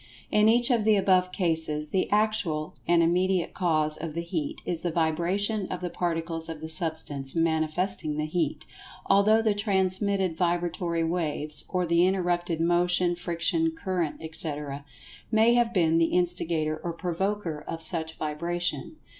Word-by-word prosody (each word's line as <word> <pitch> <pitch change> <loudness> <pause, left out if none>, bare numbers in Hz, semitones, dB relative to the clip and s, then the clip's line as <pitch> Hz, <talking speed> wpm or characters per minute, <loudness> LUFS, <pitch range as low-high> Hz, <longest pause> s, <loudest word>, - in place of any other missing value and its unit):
In 210 +1 +4
each 240 +3 +3
of 235 -3 +2
the 215 0 +4
above 185 -2 +2
cases, 160 -4 -1
the 190 - 0
actual 205 -8 0
and 170 -1 +4
immediate 180 +1 +1
cause 155 -4 0
of 160 -1 -6
the 170 - -2
Heat 295 - -4
is 170 -2 -2
the 175 - -1
vibration 175 +6 0
of 180 - -5
the 180 -1 -4
Particles 165 -1 -2
of 160 -2 -6
the 160 +1 -7
Substance 155 -4 0
manifesting 160 0 0
the 150 - -1
Heat, 155 -2 -2 0.4
although 210 +3 +4
the 215 -2 +2
transmitted 195 -2 0
vibratory 170 -1 -1
waves, 155 -3 -1
or 180 -1 0
the 170 +1 +3
interrupted 175 -3 0
motion, 175 +1 +3
friction, 175 - 0
current, 185 - -2
etc., 145 -3 -4 0.5
may 225 +1 +4
have 240 -1 +2
been 165 -5 +2
the 165 - +4
instigator 165 -3 0
or 170 - -3
provoker 175 -2 -3
of 165 0 -4
such 160 -2 0
vibration. 170 - -3
175 Hz, 150 wpm, -27 LUFS, 160-190 Hz, 0.5 s, In